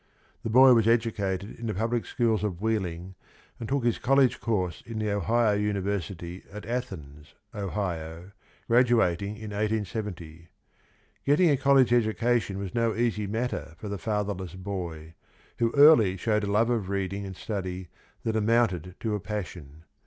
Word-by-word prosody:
The - - -4
boy 130 +3 +8
was 115 -2 +3
educated 105 -4 0
in 115 - -4
the 110 - -2
public 115 +3 -1
schools 115 -4 +1
of 95 -5 -2
Wheeling 95 -5 -2 0.5
and 115 - -6
took 140 -2 0
his 120 - +1
col 135 +2 +2
lege 135 -3 +4
course 95 -7 -1
in 115 -1 -7
the 105 -1 -1
Ohio 110 +2 +2
University 100 -3 -2
at 105 +1 -8
Athens, 80 - -6 0.2
Ohio, 90 -4 -4 0.4
graduating 115 -5 +2
in 110 -1 -8
1870. 100 -6 -3 0.7
Getting 150 +4 +4
a - - +4
college 135 -2 +4
education 115 -2 +1
was 100 -2 -5
no 115 -1 +1
easy 110 -3 0
matter 105 - -3
for 105 - -7
the 100 -1 -4
fatherless 100 -2 -3
boy, 90 -5 -6 0.5
who 115 -1 +2
early 140 -10 +7
showed 105 +1 0
a 100 - -2
love 115 +3 +3
of 110 -6 -1
reading 100 0 -2
and 95 -1 -7
study 95 -3 -5 0.3
that 110 -1 -1
amounted 105 -6 +1
to 110 -2 -1
a 105 - -1
passion. 90 -7 -7
105 Hz, 155 wpm, -27 LUFS, 95-115 Hz, 0.7 s, boy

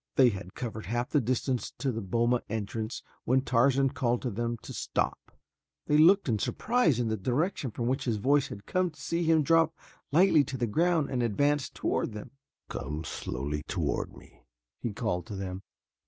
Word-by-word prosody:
They 130 -2 +6
had 95 -3 -7
covered 110 -3 -5
half 120 +3 -2
the 145 - +3
distance 125 +1 -1
to 135 - 0
the 115 -1 -3
boma 120 +5 +1
entrance 110 +2 -3 0.2
when 130 +2 +3
Tarzan 135 +2 +3
called 120 -2 0
to 125 - -1
them 120 +3 -2
to - - -8
stop. - - -2 0.5
They 150 - +2
looked 190 +4 +6
in 110 -4 +1
surprise 195 - +1
in 120 - +1
the 110 - +1
direction 130 - -1
from 115 +2 -4
which 130 +3 0
his 115 -4 0
voice 140 +6 +3
had 100 0 -9
come 185 -1 +1
to 155 - -18
see 170 +1 -1
him 160 -1 +4
drop 165 +1 +3 0.4
lightly 160 -1 +5
to 135 -2 -5
the 120 - 0
ground 160 +5 +1
and 125 -2 0
advance 145 +5 +1
toward - - -1
them. 105 - -8 0.4
"Come 75 +4 -4
slowly 75 0 -4
toward - - -2
me," - - -17 0.4
he 120 - -2
called 100 -5 -2
to 105 - -6
them. 95 -1 -5
125 Hz, 185 wpm, -29 LUFS, 110-145 Hz, 0.5 s, They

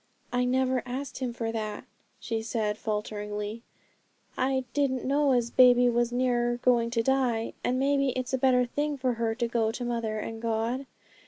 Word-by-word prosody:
'I 250 0 +2
never 255 0 +1
asked 255 +1 -5
Him 255 -2 -2
for 230 -1 -3
that,' 215 -2 -4 0.3
she 225 -1 -3
said 220 -2 -1
falteringly; 210 0 -4 0.7
'I 260 0 0
didn't 270 -3 0
know 280 +1 +2
as 240 -2 +1
baby 245 -1 +6
was 240 0 +1
near 240 -1 +1
going 240 -2 +3
to 230 -1 0
die, 250 -3 +1
and 250 - +1
maybe 275 0 +2
it's 255 +1 -3
a 260 - +1
better 250 -1 +4
thing 290 +4 -2
for 255 -1 0
her 230 -1 -1
to 235 0 -1
go 230 -1 +1
to 245 +2 -5
mother 230 -2 -2
and 225 +1 -5
God. 230 +4 -1
245 Hz, 175 wpm, -28 LUFS, 225-260 Hz, 0.7 s, baby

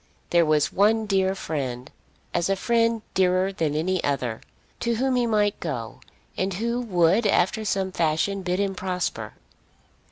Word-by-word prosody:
There 170 -2 +4
was 150 -1 +2
one 220 +3 +3
dear 190 -2 +1
friend, 130 -8 -4 0.4
as 175 +2 0
a 195 - +2
friend 230 +1 +1
dearer 185 +1 +2
than 155 -5 -1
any 180 +4 0
other, 125 -5 -1 0.4
to 235 -1 0
whom 260 +2 +1
he 245 -1 +2
might 210 -2 +1
go, 125 -7 -5 0.4
and 190 0 -1
who 235 +4 -1
would 195 0 +2
after 200 +3 +2
some 195 -2 -1
fashion 170 +4 0
bid 180 0 -1
him 200 -1 0
prosper. 185 -1 -3
190 Hz, 155 wpm, -24 LUFS, 165-210 Hz, 0.4 s, There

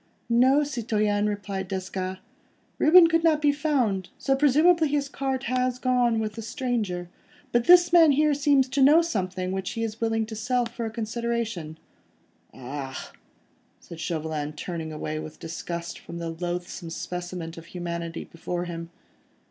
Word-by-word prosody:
"No, 260 +5 +5
citoyen," 215 -6 0
replied 200 -2 -4
Desgas, 190 0 -4 0.6
"Reuben 340 +3 +8
could 330 0 +2
not 315 -2 +4
be 295 -1 +4
found, 260 - 0
so 270 - +1
presumably 310 +4 +4
his 285 -1 0
cart 270 -1 -3
has 255 -1 0
gone 250 -2 +2
with 215 -1 -2
the 225 - -7
stranger; 220 -7 -2 0.4
but 240 0 +2
this 350 -1 +7
man 325 -4 +7
here 300 +1 +3
seems 280 -2 +3
to 270 +2 0
know 300 +5 +7
something, 185 - -2
which 190 -1 -3
he 230 -1 -3
is 225 0 -5
willing 225 -1 +1
to 220 0 -7
sell 245 +3 0
for 230 0 -5
a - - -3
consideration." 225 -7 -3 0.7
"Ah!" 135 +1 -7 0.7
said 170 - -11
Chauvelin, 155 -3 -3
turning 160 0 -5
away 155 0 -4
with 155 0 -9
disgust 170 +1 -5
from 170 - -9
the 170 -1 -4
loathsome 175 0 -5
specimen 175 0 -5
of 165 0 -11
humanity 170 -2 -5
before 175 +1 -5
him. 170 -1 -6
215 Hz, 155 wpm, -26 LUFS, 175-270 Hz, 0.7 s, Reuben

